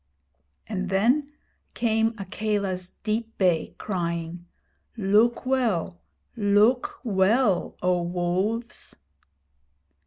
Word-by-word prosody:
And 190 -3 -3
then 250 +10 +2 0.4
came 225 -1 +1
Akela's 195 -2 -2
deep 225 +1 -2
bay, 180 -4 +1
crying: 170 -2 -3 0.5
Look 220 +5 +3
well 225 -10 0 0.3
look 225 - +3
well, 205 0 +2
O 180 -1 +2
Wolves!' 185 +7 -2
205 Hz, 80 wpm, -25 LUFS, 180-230 Hz, 0.5 s, Look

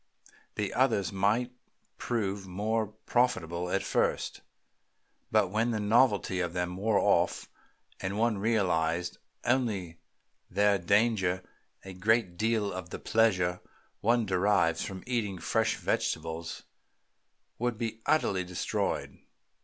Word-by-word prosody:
The - - -2
others 100 0 +2
might 105 +6 +1 0.5
prove 100 -4 -2
more 110 +4 -1
profitable 100 -6 -1
at 95 +1 0
first, - - 0 0.9
but - - +3
when 110 +3 +1
the 110 -2 -1
novelty 105 -3 +3
of 85 -2 -1
them 90 0 -2
wore 105 +2 +1
off, - - +2 0.5
and 100 +2 -3
one 115 -2 +1
realized 90 -5 0 0.3
only 105 -10 0 0.5
their 100 +1 +3
danger, 95 -1 +2 0.4
a 95 - -7
great 100 0 +1
deal 110 +1 0
of 90 -1 -6
the - - -5
pleasure 95 -6 +2 0.4
one 115 +1 +2
derives 95 -3 +2
from 95 -1 -6
eating 115 -6 -1
fresh 85 - +1
vegetables 80 +1 -2 1.0
would 120 -1 -1
be 115 -1 -4
utterly 95 -11 +2
destroyed." 90 0 -2
100 Hz, 115 wpm, -30 LUFS, 90-115 Hz, 1.0 s, but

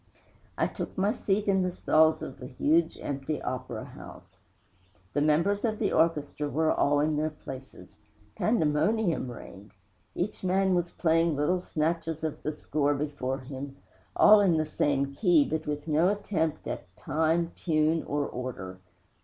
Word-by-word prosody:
I - - +2
took - - -6
my 200 +2 +2
seat 205 -1 -1
in 190 -1 +3
the 185 - +1
stalls 160 -2 +3
of 130 - -8
the 125 - -7
huge 160 +6 +1
empty 140 +2 -3
opera 125 -3 -5
house. - - -13 0.8
The 145 - +1
members 165 +7 +2
of 220 -2 0
the - - 0
orchestra 150 -2 +1
were 160 +2 +1
all 145 0 +2
in 150 +1 +1
their 155 +1 0
places. 135 -10 -11 0.4
Pandemonium 180 - +1
reigned! 105 -3 -11 0.4
Each 190 +2 -3
man 190 +1 +2
was 175 -1 0
playing 165 -2 +2
little 150 +6 +1
snatches 165 -1 -2
of 155 -2 -3
the 155 - -2
score 145 -1 0
before 140 -2 -3
him, 135 +1 -7 0.4
all 215 0 +8
in 180 -5 +3
the 155 - +1
same 140 -2 0
key, 170 -4 +4
but 155 0 -3
with 150 +1 -3
no 160 +3 +3
attempt 180 -6 -1
at - - -6
time, 160 +3 0
tune 155 -1 +1
or 145 0 -1
order. 115 -9 -6
155 Hz, 155 wpm, -28 LUFS, 145-170 Hz, 0.8 s, all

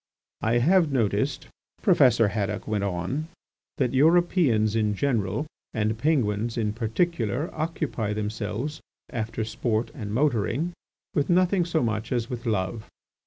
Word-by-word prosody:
"I 115 +2 +2
have 165 +5 +4
noticed," 130 +4 0 0.4
Professor 125 - +5
Haddock 105 0 -2
went 105 -2 0
on, 100 - -2 0.5
"that 130 -2 +1
Europeans 145 - +3
in 105 -2 +1
general 115 0 0 0.3
and 110 0 +1
Penguins 115 -5 0
in 105 -2 0
particular 120 - -1
occupy 155 -9 -2
themselves, 110 +6 -3 0.3
after 110 -1 -3
sport 110 +2 -1
and 110 -9 -6
motoring, 140 +5 +1 0.4
with 145 -3 0
nothing 180 0 +3
so 165 -3 0
much 110 -1 -2
as 120 -2 -1
with 120 -1 -5
love. 105 +1 -2
115 Hz, 125 wpm, -26 LUFS, 110-150 Hz, 0.5 s, Professor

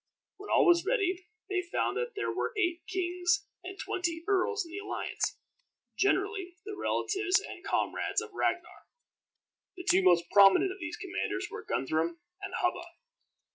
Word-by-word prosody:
When 405 - -10
all - - +5
was 345 -1 +5
ready, 380 -4 0 0.2
they 380 -2 0
found 345 - -1
that 475 0 -2
there 415 - -1
were 470 - -2
eight 355 -4 +1
kings 355 -1 0 0.2
and 380 +2 -7
twenty 335 -4 -2
earls 405 0 +1
in 330 - -12
the 385 - -5
alliance, 405 -1 -3 0.6
generally 390 -2 0
the 420 -1 -5
relatives 395 -1 +1
and 405 - -9
comrades - - 0
of - - -8
Ragnar. 345 -1 -2 0.9
The 360 - -7
two 190 - +5
most 175 -2 +5
prominent 200 - +7
of 380 - -9
these 345 +4 -5
commanders 405 0 -3
were 440 0 -6
Guthrum 160 - -1 0.2
and 390 -1 -5
Hubba. 360 -1 0
370 Hz, 155 wpm, -30 LUFS, 345-400 Hz, 0.9 s, prominent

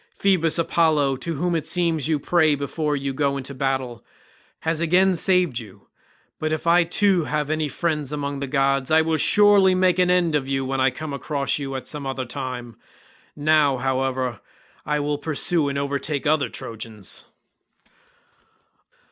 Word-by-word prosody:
Phoebus 180 -5 +2
Apollo, 155 -5 +2
to 165 +5 -4
whom 175 +4 -1
it 155 -2 -2
seems 165 -5 0
you 160 -2 +1
pray 155 0 +2
before 145 +1 -2
you 140 -1 -3
go 140 0 0
into 135 +1 -6
battle, 130 -3 -2 0.6
has 160 0 -1
again 180 +3 +3
saved 175 -7 +2
you; 100 -3 -14 0.5
but 155 0 -2
if 155 +1 -3
I 170 +1 +5
too 180 0 +2
have 150 0 -2
any 155 -1 0
friend 150 -1 -2
among 140 -1 -3
the 140 - -4
gods 135 -1 +1
I 160 0 +4
will 160 0 0
surely 200 +2 +5
make 185 -1 +2
an 180 0 +3
end 180 -3 +2
of 145 -3 0
you 135 -1 -1
when 135 0 -1
I 130 - +4
come 145 +4 -7
across 140 0 -2
you 135 -1 -5
at 130 -1 -5
some 145 -1 -5
other 130 -1 -3
time. 125 -2 -6 0.6
Now, 150 -2 +3
however, 130 -2 -1 0.5
I 150 0 0
will 145 0 -2
pursue 155 0 0
and 140 - -3
overtake 140 +1 -2
other 155 -1 +2
Trojans." 110 -5 -8
145 Hz, 165 wpm, -23 LUFS, 135-165 Hz, 0.6 s, I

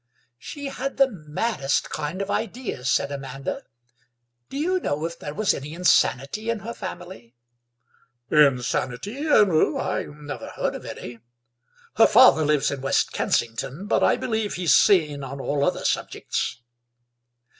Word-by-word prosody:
"She 285 - -8
had 275 0 -4
the 270 0 +5
maddest 155 -3 -2
kind 155 +6 -3
of 200 - -5
ideas," 220 - -3
said 140 - +1
Amanda; 135 -1 -5 0.9
"do - - -6
you 365 +5 +1
know 150 - -2
if 170 0 -6
there 145 0 -7
was 215 -2 +2
any 150 +4 -6
insanity 180 - +2
in 230 -3 -1
her 230 +4 -6
family?" 175 - -9 1.0
"Insanity? 140 - +1
No, 210 - +3
I - - -2
never 145 0 -8
heard - - -2
of - - -8
any. 120 -1 -8 0.8
Her - - +7
father 255 -11 +6
lives 150 -2 +2
in 140 -2 -5
West 135 - +1
Kensington, 135 - -2
but 210 - +1
I - - +4
believe 220 -3 -2
he's 175 -6 +2
sane 150 -6 +4
on 135 +1 -7
all 140 +1 -1
other - - 0
subjects." 115 - -2
155 Hz, 145 wpm, -24 LUFS, 140-215 Hz, 1.0 s, Her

